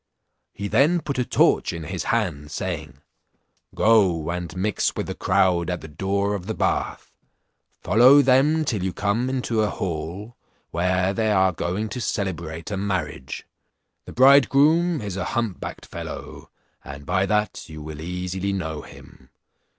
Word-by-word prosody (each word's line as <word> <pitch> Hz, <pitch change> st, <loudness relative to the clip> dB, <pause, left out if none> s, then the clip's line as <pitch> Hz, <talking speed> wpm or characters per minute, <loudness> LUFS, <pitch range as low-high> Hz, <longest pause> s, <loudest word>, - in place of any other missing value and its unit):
He 100 Hz, -, -5 dB
then 155 Hz, -, +3 dB
put 140 Hz, -3 st, -3 dB
a -, -, +2 dB
torch -, -, +3 dB
in 85 Hz, -1 st, -6 dB
his 75 Hz, -, -4 dB
hand, 85 Hz, -11 st, -1 dB
saying, 65 Hz, -2 st, -5 dB, 0.7 s
"Go, 95 Hz, -8 st, +3 dB
and 90 Hz, -1 st, -5 dB
mix 105 Hz, +3 st, 0 dB
with -, -, -2 dB
the -, -, -4 dB
crowd 95 Hz, -2 st, +1 dB
at 90 Hz, -1 st, -3 dB
the -, -, -9 dB
door 100 Hz, +6 st, -1 dB
of 95 Hz, -2 st, -5 dB
the 110 Hz, -, -3 dB
bath; -, -, -2 dB, 0.7 s
follow 125 Hz, +9 st, +6 dB
them 140 Hz, +5 st, +3 dB
till 105 Hz, -9 st, -1 dB
you 95 Hz, -1 st, -2 dB
come 105 Hz, +5 st, 0 dB
into 125 Hz, -4 st, -1 dB
a 105 Hz, -, +1 dB
hall, 95 Hz, +7 st, -5 dB, 0.4 s
where 90 Hz, +2 st, +1 dB
they 110 Hz, 0 st, 0 dB
are 95 Hz, -2 st, +4 dB
going 90 Hz, +5 st, -2 dB
to 125 Hz, -, -5 dB
celebrate 85 Hz, -5 st, -3 dB
a 100 Hz, -, -2 dB
marriage. 80 Hz, -8 st, -3 dB, 0.6 s
The -, -, -9 dB
bridegroom 145 Hz, +5 st, +5 dB
is 100 Hz, -3 st, -5 dB
a 90 Hz, -, -2 dB
hump 115 Hz, -6 st, -1 dB
backed -, -, -7 dB
fellow, -, -, -8 dB, 0.3 s
and 70 Hz, +1 st, -9 dB
by 90 Hz, +4 st, +1 dB
that 105 Hz, -4 st, -1 dB
you 75 Hz, -1 st, -8 dB
will 75 Hz, 0 st, -8 dB
easily 90 Hz, +3 st, -3 dB
know 80 Hz, -5 st, -3 dB
him. -, -, -15 dB
95 Hz, 160 wpm, -23 LUFS, 85-115 Hz, 0.7 s, follow